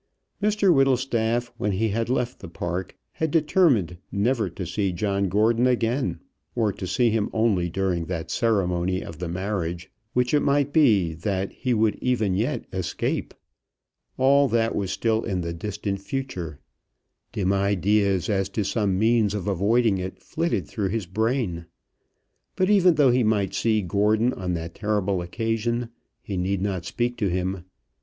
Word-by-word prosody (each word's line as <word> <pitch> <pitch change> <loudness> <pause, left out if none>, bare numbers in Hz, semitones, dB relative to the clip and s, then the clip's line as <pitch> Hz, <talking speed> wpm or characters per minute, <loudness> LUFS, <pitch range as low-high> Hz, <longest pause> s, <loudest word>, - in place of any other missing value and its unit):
Mr 205 -3 +3
Whittlestaff 120 -4 +1
when 105 - -1
he 110 +4 +1
had 115 +3 -1
left 125 -1 -1
the 95 - -9
park 90 +2 -4
had 160 - -2
determined 145 - +2
never 110 +3 +1
to 95 - -6
see 100 +2 -1
John 100 +1 -1
Gordon 115 +5 +3
again, 125 +2 0 0.3
or 110 -4 +1
to 95 - -6
see 115 +5 +2
him 110 -2 0
only 105 -6 +1
during 90 -2 -1
that 85 -2 -4
ceremony 95 -4 0
of 85 -2 -9
the 90 - -3
marriage, 90 -1 -3 0.2
which 125 +1 +1
it 150 - +5
might 140 0 +1
be 105 - +4
that 95 +3 -2
he 125 -2 -1
would 110 -1 +2
even 110 -6 +1
yet 95 - -1
escape. - - -2 0.8
All 140 +2 +5
that 115 -1 +1
was 100 -2 -1
still 110 +1 0
in 95 -5 -2
the 85 0 -3
distant 100 +2 -4
future. 100 - -5 0.7
Dim 95 -1 0
ideas 100 -1 +2
as 95 -2 0
to 105 +2 -1
some 100 -2 0
means 110 -1 +2
of 100 -2 -4
avoiding 100 +2 +2
it 95 +1 -5
flitted 155 - -2
through 100 -3 -2
his 110 0 -2
brain. 105 -3 -1 0.9
But 185 +2 +2
even 185 -4 +5
though 140 -4 +5
he 125 0 +3
might 100 -3 +1
see 110 -1 +1
Gordon 105 +6 +2
on 90 -2 -3
that 85 0 -5
terrible 100 -3 -1
occasion, 115 +5 -2 0.3
he 100 - -4
need 95 +1 -1
not 95 -4 -2
speak 120 +4 -2
to 105 - 0
him. 90 0 -2
105 Hz, 160 wpm, -24 LUFS, 95-120 Hz, 0.9 s, it